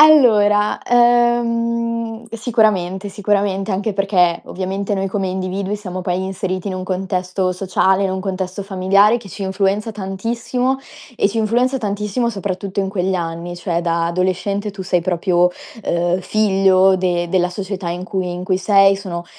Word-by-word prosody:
Allora, 215 -9 +5
ehm, 235 -1 +1
sicuramente, 210 -5 0
sicuramente 200 0 0
anche 200 +2 -1
perchè 190 -3 +2
ovviamente 195 +2 -3
noi 195 0 -1
come 190 -1 -2
individui 190 +2 -3
siamo 185 -3 -6
poi 180 +1 -2
inseriti 190 0 -3
in 185 - -3
un 185 0 -4
contesto 185 0 -1
sociale, 190 +1 +1
in 190 - 0
un 190 - -2
contesto 190 0 -4
familiare 200 +3 +3
che 210 -4 -12
ci 200 - -7
influenza 195 +3 0
tantissimo 230 +6 -2 0.4
e 200 - +3
ci 220 - -6
influenza 240 +4 +1
tantissimo 210 +1 -1
soprattutto 195 -1 -3
in 195 - -1
quegli 190 -1 -1
anni, 170 0 -4
cioè 175 -1 -2
da 170 -1 0
adolescente 185 +4 -1
tu 195 -1 -7
sei 180 -2 0
proprio, 180 0 +2 0.3
uhm, 175 +1 0
figlio 190 -2 +3
de 175 -2 0
della 180 0 +1
società 190 -2 -4
in 180 +1 -4
cui 185 -1 -2
in 180 +1 -5
cui 185 0 +1
sei, 195 0 +4
sono 175 -3 -6
195 Hz, 155 wpm, -19 LUFS, 185-210 Hz, 0.4 s, Allora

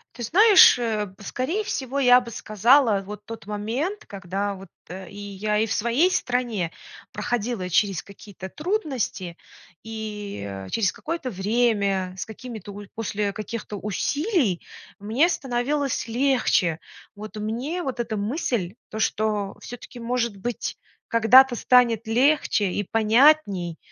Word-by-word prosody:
Ты 240 - -9
знаешь, 390 - +7
э, 220 -4 -1
б 185 - -17
скорее 295 - -2
всего, 275 - -3
я 250 -1 +6
бы 240 - -9
сказала, 220 +1 +3
вот 210 +1 -9
тот 225 -2 -9
момент, 240 - -3
когда 200 +1 -4
вот, 195 0 -11 0.2
э 185 0 -8
и 200 - -12
я 205 +1 -2
и 220 - +2
в 220 - -2
своей 235 - +2
стране 240 - -1 0.4
проходила 235 -5 -2
через 185 0 +1
какие-то 200 -1 -11
трудности 275 - -3 0.4
и, 210 - -6
э, 95 -1 -7
через 200 -5 +1
какое-то 310 -6 -5
время, 200 -2 0
с 190 - -6
какими-то 220 -2 -9
уль 205 0 -10
после 210 -2 -2
каких-то 215 0 -6
усилий 245 - 0 0.4
мне 225 +11 +2
становилось 275 -3 -1
легче. 235 - +1 0.4
Вот 210 0 -9
мне 245 +12 -3
вот 265 -5 -4
эта 230 -2 -2
мысль, 215 - -2
то, 220 - -6
что 210 -2 -1
всё-таки, 245 +1 -10
может 235 -3 -1
быть, 240 +4 -4 0.3
когда-то 245 +3 +6
станет 235 -2 +3
легче 250 -1 +2
и 205 - -1
понятней, 220 - +3
225 Hz, 135 wpm, -24 LUFS, 200-250 Hz, 0.4 s, знаешь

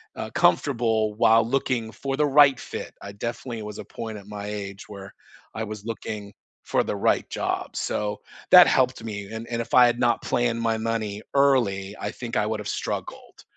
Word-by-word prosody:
uh, - - -5
comfortable 115 -5 +2
while 115 0 +5
looking 120 -3 -1
for 135 +2 -4
the 150 - +3
right 145 -2 +6
fit. - - -7
I 100 - -7
definitely 115 +2 -5
was 105 0 -7
a - - -7
point 110 -2 -7
at 100 - -12
my 105 -1 -6
age 100 -1 -6
where 100 -1 -10 0.4
I 110 - -2
was 105 0 -8
looking 105 -3 -6 0.3
for - - +1
the - - -3
right - - +1
job, - - -3
so, 105 0 -2 0.3
that - - +10
helped 115 - +2
me, 100 -3 -5
and 110 +1 -6
and 115 -1 -2
if - - -8
I 125 -1 +8
had 120 0 0
not 120 -1 +2
planned 120 -1 0
my 115 -1 +1
money 110 -2 -3
early, 110 -8 +2
I 105 - -3
think 120 -3 -5
I 105 - +2
would've 105 -1 -3
struggled, - - -5
110 Hz, 190 wpm, -25 LUFS, 105-120 Hz, 0.4 s, that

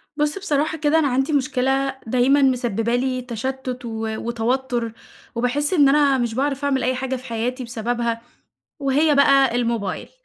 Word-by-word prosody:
بُص 295 +3 0
بصراحة 315 -4 -1
كده 310 +1 +2
أنا 295 - +2
عندي 270 +3 0
مشكلة 270 0 0
دايمًا 255 +4 +3
مسببة 240 -3 +1
لي 255 0 -1
تشتّت 250 +1 -5
و 225 -1 -4
وتوتُّر، 235 0 -2 0.4
وباحس 275 +7 0
إن 290 -6 +5
أنا 280 -1 +4
مش 240 -3 -1
باعرف 275 +1 -1
أعمل 270 -2 +1
أي 255 +1 +1
حاجة 260 +1 -2
في 255 0 -9
حياتي 245 +2 -3
بسببها، 235 0 -2 0.6
وهي 290 +2 +2
بقى 275 -3 +4
الموبايل. 230 -5 -2
260 Hz, 150 wpm, -22 LUFS, 240-280 Hz, 0.6 s, إن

